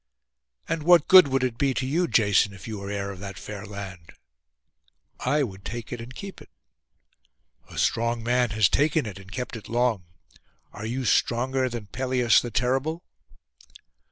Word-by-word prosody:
'And 165 Hz, -1 st, -2 dB
what 175 Hz, +2 st, +5 dB
good 185 Hz, -5 st, +9 dB
would 135 Hz, -1 st, 0 dB
it 120 Hz, -2 st, -2 dB
be 135 Hz, -2 st, +1 dB
to 130 Hz, -, -1 dB
you, 170 Hz, +7 st, +1 dB
Jason, 100 Hz, -, +3 dB
if 95 Hz, -, -11 dB
you 110 Hz, -2 st, -5 dB
were 100 Hz, 0 st, -6 dB
heir 100 Hz, -1 st, -3 dB
of 95 Hz, -, -10 dB
that 100 Hz, -1 st, -7 dB
fair 105 Hz, 0 st, -8 dB
land?' 95 Hz, -5 st, -9 dB, 1.1 s
'I 145 Hz, +3 st, +1 dB
would 95 Hz, -6 st, -7 dB
take 120 Hz, 0 st, -6 dB
it 120 Hz, -, -5 dB
and 125 Hz, +2 st, -10 dB
keep 195 Hz, -1 st, -8 dB
it.' -, -, -15 dB, 1.2 s
'A -, -, -11 dB
strong 115 Hz, 0 st, 0 dB
man 125 Hz, +1 st, +2 dB
has 110 Hz, -1 st, +3 dB
taken 150 Hz, 0 st, +1 dB
it 100 Hz, -3 st, -7 dB
and 95 Hz, 0 st, -14 dB
kept 125 Hz, +1 st, -5 dB
it 110 Hz, -, -9 dB
long. 120 Hz, -5 st, +1 dB, 0.7 s
Are 105 Hz, +1 st, -6 dB
you 125 Hz, +3 st, -3 dB
stronger 130 Hz, +3 st, +1 dB
than 120 Hz, -3 st, -6 dB
Pelias 125 Hz, 0 st, +2 dB
the 120 Hz, -, -5 dB
terrible? 135 Hz, -, -1 dB
120 Hz, 175 wpm, -25 LUFS, 105-130 Hz, 1.2 s, good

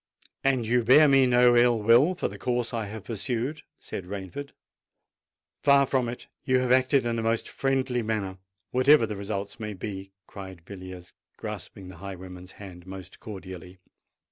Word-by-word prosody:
"And 130 Hz, -4 st, +2 dB
you 120 Hz, +2 st, +2 dB
bear 140 Hz, +7 st, +7 dB
me 135 Hz, -2 st, +5 dB
no 125 Hz, 0 st, +5 dB
ill 120 Hz, 0 st, +5 dB
will 120 Hz, -, +5 dB
for -, -, -1 dB
the -, -, -9 dB
course 120 Hz, -1 st, -1 dB
I 115 Hz, -3 st, -2 dB
have 105 Hz, 0 st, -8 dB
pursued?" 125 Hz, +6 st, -3 dB, 0.2 s
said 95 Hz, -, -7 dB
Rainford. 100 Hz, +9 st, -6 dB, 1.1 s
"Far 140 Hz, -1 st, +6 dB
from 130 Hz, -3 st, 0 dB
it. 120 Hz, -, -7 dB, 0.2 s
You 130 Hz, 0 st, +3 dB
have 125 Hz, -1 st, 0 dB
acted 130 Hz, +1 st, +4 dB
in 115 Hz, -1 st, 0 dB
a -, -, -1 dB
most 115 Hz, 0 st, 0 dB
friendly 130 Hz, -2 st, 0 dB
manner—whatever 110 Hz, +6 st, +1 dB
the 105 Hz, -1 st, -5 dB
result 100 Hz, +1 st, -5 dB
may 105 Hz, -1 st, -4 dB
be!" 95 Hz, 0 st, -6 dB
cried 95 Hz, -4 st, -10 dB
Villiers, 95 Hz, -2 st, -9 dB, 0.2 s
grasping 95 Hz, -2 st, -7 dB
the 95 Hz, -, -11 dB
highwayman's 90 Hz, 0 st, -9 dB
hand 90 Hz, -3 st, -11 dB
most 95 Hz, -1 st, -9 dB
cordially. 95 Hz, -4 st, -9 dB
110 Hz, 160 wpm, -27 LUFS, 95-125 Hz, 1.1 s, bear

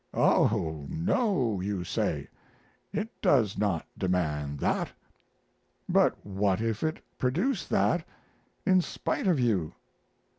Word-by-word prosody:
Oh 80 Hz, -9 st, +2 dB
no, 165 Hz, -, +1 dB
you 95 Hz, -1 st, -2 dB
say; -, -, -1 dB, 0.6 s
it 215 Hz, +2 st, -2 dB
does 110 Hz, -8 st, +3 dB
not 100 Hz, -6 st, 0 dB
demand 75 Hz, -6 st, -1 dB
that. -, -, 0 dB, 1.0 s
But -, -, +2 dB
what 95 Hz, -1 st, +1 dB
if 110 Hz, -1 st, -1 dB
it 155 Hz, 0 st, -1 dB, 0.2 s
produce 175 Hz, -, 0 dB
that -, -, +2 dB, 0.6 s
in 185 Hz, -2 st, +5 dB
spite 185 Hz, -, -2 dB
of 170 Hz, -7 st, +3 dB
you? 100 Hz, -10 st, +1 dB
105 Hz, 110 wpm, -29 LUFS, -, 1.0 s, in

